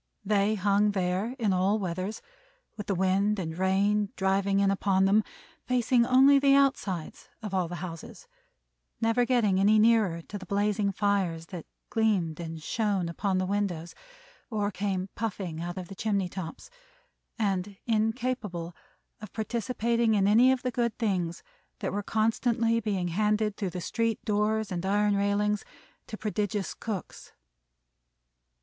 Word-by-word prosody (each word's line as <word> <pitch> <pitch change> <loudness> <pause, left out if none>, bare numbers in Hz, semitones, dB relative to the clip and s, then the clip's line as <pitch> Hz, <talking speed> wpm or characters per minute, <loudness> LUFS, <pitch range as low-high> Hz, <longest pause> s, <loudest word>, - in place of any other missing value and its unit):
They 205 +1 +2
hung 205 +1 +2
there 190 +5 -1
in 215 -6 +1
all 190 +3 +2
weathers, 185 +2 -4 0.5
with 210 -2 -7
the 195 - 0
wind 190 +3 +2
and 160 -4 -4
rain 195 +3 +1
driving 195 +1 +1
in 200 0 +3
upon 190 -1 +2
them; 205 +3 +4 0.4
facing 245 -1 +2
only 270 +2 +6
the 275 0 +5
outsides 240 - 0
of 210 -3 -5
all 185 -2 +1
the 175 +1 -5
houses; 165 - -10 0.7
never 230 +2 +2
getting 225 -7 +2
any 210 +2 +5
nearer 215 -7 +3
to 205 - -7
the 190 - -10
blazing 205 +1 +1
fires 195 -5 0
that 175 -4 -8 0.2
gleamed 195 -8 +1
and 165 -2 -6
shone 200 -5 0
upon 190 +3 -1
the 185 - 0
windows 185 -4 -2 0.6
or 210 -3 -1
came 190 -1 -2
puffing 190 -7 -4
out 175 +2 -5
of 180 -1 -5
the 195 - -9
chimney 200 -2 -1
tops; 175 - -8 0.7
and 195 -2 -1
incapable 220 -6 -1 0.5
of 215 -2 -9
participating 235 0 0
in 195 -1 +3
any 235 +5 +6
of 260 -1 -1
the 250 - -1
good 235 -1 -1
things 185 -7 -1 0.3
that - - -3
were 205 - -1
constantly 225 +2 +1
being 195 -5 -1
handed 210 +3 +1
through 195 -3 -2
the 180 - -5
street 230 +4 -1
doors 215 0 0
and 175 -1 -3
iron 205 +1 +2
railings 205 +1 +1 0.4
to 215 - -6
prodigious 210 -2 -2
cooks. 210 -6 -7
205 Hz, 150 wpm, -28 LUFS, 185-220 Hz, 0.7 s, only